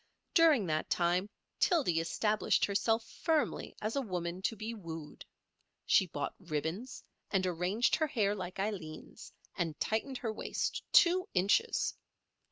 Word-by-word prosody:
During 320 - +5
that 155 -2 -1
time 180 +3 +1 0.3
Tildy 280 - +3
established 210 +6 +1
herself 225 +3 +1
firmly 315 +3 -1
as 215 +4 -1
a 280 - +1
woman 180 -5 -4
to 225 - 0
be 220 +2 -5
wooed. 165 -7 -8 0.6
She - - +4
bought - - -4
ribbons, 160 - -4 0.3
and 190 -2 +1
arranged 180 +6 +1
her 315 - +1
hair 210 -7 +1
like 185 -2 -6
Aileen's, 190 -6 -5 0.2
and 165 -4 -2
tightened 250 +5 -1
her 225 -3 -3
waist - - -2
two 360 +1 +5
inches. 205 - +2
205 Hz, 135 wpm, -33 LUFS, 175-235 Hz, 0.6 s, During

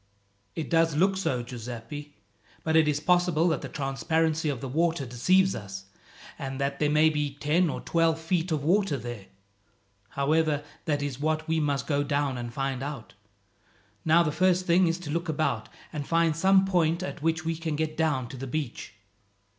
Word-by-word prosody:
"It 160 - -3
does 165 -2 +3
look 190 +5 +3
so, 130 -10 -1
Giuseppi; 125 +4 -8 0.5
but 160 0 0
it 160 -1 +5
is 150 -1 +1
possible 175 0 +3
that 160 - -1
the - - -6
transparency 160 +3 0
of 135 -4 -2
the 135 - -5
water 160 +2 0
deceives 185 +11 +3
us, 95 -2 -7 0.5
and 135 0 -5
that 140 0 -1
there 150 - +2
may 155 +1 +4
be 150 -2 -2
ten 155 +4 +2
or - - -4
twelve 165 -1 +1
feet 165 +1 -1
of 150 -3 0
water 180 -2 +2
there. 120 -5 -7 0.8
However, 150 +1 +1 0.2
that 145 -2 0
is 140 -3 -4
what 155 +1 -1
we 160 0 +1
must 145 -2 0
go 145 -2 +1
down 145 -3 -1
and 120 -1 -5
find 135 0 -2
out. 140 -4 -6 0.9
Now 165 +2 +5
the 150 - 0
first 185 +2 +2
thing 180 +1 +4
is 165 +1 0
to 150 -4 -6
look 170 +2 -2
about, 155 0 -1 0.2
and 145 -3 -4
find 165 -1 +2
some 190 +3 +4
point 170 -2 +1
at 185 - -6
which 160 0 0
we 165 0 0
can 160 -1 -3
get 155 0 -2
down 150 -6 0
to 135 - -8
the 135 +2 -6
beach." 125 -5 -4
155 Hz, 185 wpm, -27 LUFS, 140-165 Hz, 0.9 s, it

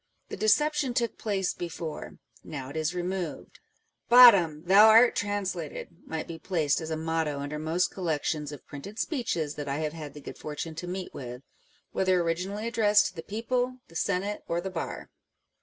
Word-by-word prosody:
The - - -5
deception 290 +3 +2
took 235 -2 -1
place 195 -4 -1
before; 165 -2 -6 0.3
now 135 -2 -7
it - - -11
is 160 +2 -1
removed. 180 -2 -4 0.3
" - - -48
Bottom! 180 -11 +8
thou 200 +4 +8
art 225 +2 +7
translated 195 -6 -3
!" - - -26
might 160 -1 -4
be 165 -1 -7
placed 160 -5 0
as 160 - -5
a 160 - -2
motto 160 -2 -1
under 145 +2 -4
most 165 +4 0
col 185 - -6
lections 150 -1 -1
of 145 - -10
printed 175 +10 -9
speeches 225 - -2
that 145 -1 -6
I 140 - -1
have 155 -1 -2
had 155 -3 -8
the - - -8
good 140 - -9
â€¢fortune 155 +2 -6
to 175 - -5
meet 185 +1 -5
with, 125 0 -8 0.5
whether 185 -1 +2
originally 180 +5 -2
addressed 215 -3 +4
to - - -18
the 165 - -5
people, 245 +6 -2
the 165 - -17
senate, 200 +4 -1
or 170 - 0
the 190 +2 -5
bar. 165 -3 -5
175 Hz, 190 wpm, -28 LUFS, 155-205 Hz, 0.5 s, Bottom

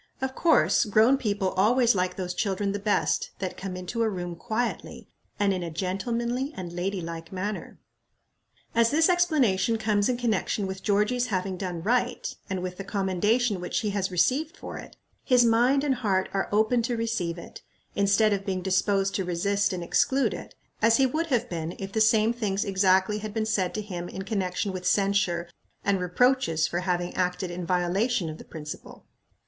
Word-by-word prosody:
Of 265 -1 -2
course, 325 -3 +3
grown 220 +6 +4
people 200 -6 -1
always 235 +6 +3
like 180 -1 -1
those 180 -2 -3
children 195 +1 -1
the 205 - -3
best 205 0 +1
that 185 -2 -4
come 190 -1 -6
into 185 +6 -4
a 225 - +2
room 175 -3 -4
quietly, 225 +7 -3 0.3
and 200 -1 +3
in 185 - -3
a 170 - -4
gentlemanly 235 - -2
and 175 -2 -6
lady 185 +2 -2
like 165 0 -7
manner." 200 +3 -4 1.0
As 230 0 +4
this 320 +5 +3
explanation 270 - +2
comes 210 -1 +1
in 250 - 0
connection 220 -3 0
with 190 0 -5
Georgia's 210 +5 +1
having 190 -3 -2
done 180 -3 -5
right, 245 +3 0
and 190 -2 -3
with 180 0 -5
the 195 - -5
commendation 200 +3 0
which 180 - -2
he 210 - -1
has 195 -1 -1
received 265 - +1
for - - -7
it, - - -12 0.3
his 250 -2 +4
mind 245 +5 +3
and 285 -2 +2
heart 200 -7 0
are 195 - -1
open 220 +3 +3
to 235 +1 -2
receive 195 -7 -2
it, 170 - -10 0.3
instead 200 +2 +3
of 195 -1 -2
being 185 -2 -3
disposed 195 +1 +1
to 190 - -1
resist 200 +3 0
and 180 -2 -4
exclude 265 +9 +2
it, - - -9 0.3
as 230 +1 +5
he 270 - +4
would 315 +6 -1
have 245 -5 0
been 165 -1 -4
if 195 0 -6
the 220 - 0
same 220 +1 +4
things 205 -4 -1
exactly 190 +1 +2
had 215 0 -7
been 220 -1 0
said 195 -4 0
to 215 - -2
him 175 -4 -6
in 190 - -6
connection 195 -1 -2
with 185 -1 -5
censure 195 -4 +1 0.4
and 200 -1 +2
reproaches 180 -4 +2
for 175 - -2
having 180 -1 -1
acted 180 0 -1
in 175 -1 -5
violation 180 +2 +1
of 155 - -10
the - - -9
principle. 150 -1 -9
200 Hz, 185 wpm, -26 LUFS, 185-230 Hz, 1.0 s, as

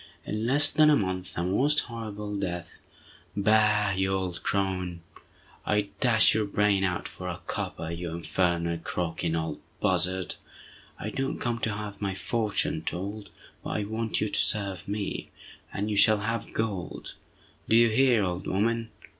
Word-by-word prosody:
In 110 +2 -2
less 145 +3 +7
than 155 0 +5
a 150 - +6
month, 95 -5 -2
the 85 - -1
most 135 +12 +3
horrible 105 -3 -6
death—" 90 -3 -4 0.6
"Bah, 105 -1 +4
you 95 0 +1
old 95 -2 -2
crone! 90 -3 -1 0.6
I'd 105 -1 +1
dash 115 -4 +5
your 110 -1 +1
brains 100 -1 +2
out 90 -1 -1
for 90 - -7
a 85 -2 -4
copper, 80 0 -4
you 85 +1 -4
infernal 85 0 0
croaking 85 0 -2
old 80 -2 -3 0.2
buzzard! 90 +2 +1 0.7
I 110 - -4
don't 135 +3 -2
come 120 -1 -1
to 110 -1 -1
have 105 0 -6
my 100 -2 -1
fortune 110 +2 -1
told, 100 +4 -5 0.3
but - - -5
I 105 - -1
want 110 +2 -2
you 105 - 0
to - - +1
serve 100 -4 0
me, 100 0 -3 0.4
and 105 +2 -2
you 105 - 0
shall 105 +1 +6
have 115 +1 -3
gold—do 110 +1 -4
you 115 0 +6
hear, 120 -1 +4
old 90 -1 -3
woman? 115 +4 0
100 Hz, 155 wpm, -27 LUFS, 90-110 Hz, 0.7 s, less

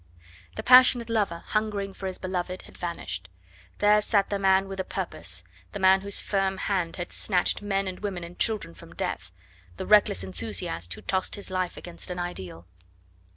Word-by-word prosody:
The - - -4
passionate 250 -2 +7
lover, 200 -7 0
hungering 210 -2 -1
for 190 - -5
his 185 - -2
beloved, 185 0 -3
had - - -15
vanished; 95 - -5 0.5
there 210 0 +5
sat 205 -2 +1
the 200 - 0
man 190 0 +4
with 195 0 -6
a - - +1
purpose, - - -5 0.3
the 205 - -4
man 190 0 +6
whose 200 0 0
firm 195 -1 0
hand 185 -4 -1
had 175 - -5
snatched 185 0 +1
men 195 -1 0
and 185 -1 -5
women 195 -4 -4
and 170 +1 -10
children 215 - 0
from - - -14
death, - - -3 0.5
the - - -4
reckless 205 - +5
enthusiast 85 -1 -2
who - - -11
tossed 190 -1 0
his 200 -1 -7
life 185 -1 -1
against 175 0 -8
an 180 - -4
ideal. 95 - -6
190 Hz, 180 wpm, -27 LUFS, 175-200 Hz, 0.5 s, passionate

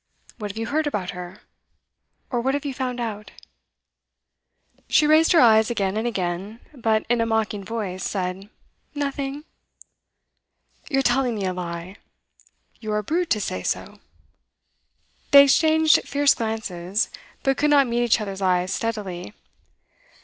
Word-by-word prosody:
What 210 -1 -4
have 200 - -8
you 225 - -2
heard 300 +4 0
about 200 -10 -2
her? 180 +2 -9 0.9
Or 240 -2 0
what 265 +3 0
have 285 - -4
you 280 - -2
found 255 -2 -3
out?' 215 -3 -5 1.6
She 305 - +4
raised 310 +2 +5
her 340 - +6
eyes 220 -4 +5
again 200 -4 -1
and 220 +2 -1
again, 195 +1 -3
but 225 -5 0
in 240 0 +2
a - - +2
mocking 220 -2 -1
voice 200 -4 -4
said, 190 +1 -3 0.5
'Nothing.' 280 0 -3 1.4
'You're 270 -3 +1
telling 245 -1 +1
me 200 -2 -3
a 185 - -1
lie.' 175 +1 -6 0.8
'You're 215 -1 -2
a 210 - -2
brute 335 - -1
to 215 - +2
say 95 - -3
so!' - - -4 1.3
They 280 0 +9
exchanged 315 +2 +4
fierce 285 0 +4
glances, 215 -3 -2 0.3
but 270 -1 +1
could 300 - +2
not 285 -2 +5
meet 240 0 0
each 235 -1 +3
other's 195 -2 -5
eyes 185 0 +1
steadily. 205 -5 -4
225 Hz, 145 wpm, -23 LUFS, 195-270 Hz, 1.6 s, They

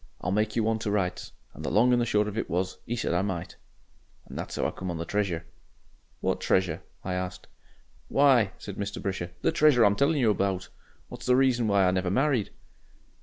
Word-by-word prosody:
'I'll 90 - -2
make 105 +2 0
you 115 - +2
one 110 0 +1
to 105 - -3
rights.' 95 -3 -1 0.2
And - - -10
the - - -1
long 125 +4 +4
and 120 - +3
the 120 - 0
short 105 -1 +2
of 105 - -5
it 115 - -2
was, 90 +2 -2
he 120 - -1
said 110 - -1
I 90 - +2
might. 95 -4 -4 0.7
"And - - -11
that's - - -5
'ow - - 0
I - - -3
come 95 - -6
on 85 - -3
the 85 - -4
treasure." 90 -3 -1 0.8
"What - - -1
treasure?" 95 -1 +1 0.2
I 90 - -3
asked. 90 0 -4 0.6
"Why!" 130 -8 +4
said 100 -2 -8
Mr. 100 0 -4
Brisher, 95 -3 -3
"the - - +3
treasure 150 -6 +5
I'm 100 0 +4
telling 140 +6 +2
you 120 -6 +4
about, 95 -3 -1 0.4
what's - - -9
the 125 - +5
reason 125 -3 +3
why 100 -2 +4
I - - +3
never 90 0 0
married." 130 +1 +1
100 Hz, 220 wpm, -27 LUFS, 95-120 Hz, 0.8 s, treasure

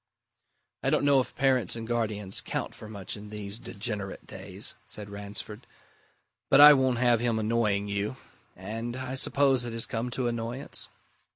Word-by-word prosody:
"I - - +1
don't - - +2
know 140 -1 +6
if 130 - -3
parents 130 -3 +2
and 115 -1 -5
guardians 105 -4 -1
count - - -3
for 110 -1 -10
much 100 -4 -5
in 105 0 -10
these 105 0 -6
degenerate 105 -4 -5
days," - - -3
said 105 -1 -5
Ransford. 105 +2 -7 0.8
"But 135 - +6
I 150 +1 +12
won't 130 -3 +2
have 120 -1 +4
him 120 -1 +1
annoying 110 -2 +1
you. 100 +4 -2 0.4
And 115 +6 -5
I 130 0 -4
suppose 135 -1 +3
it 120 -1 -5
has 115 0 -2
come 115 +2 -3
to 125 +1 -2
annoyance?" 120 +3 -4
115 Hz, 165 wpm, -28 LUFS, 105-125 Hz, 0.8 s, I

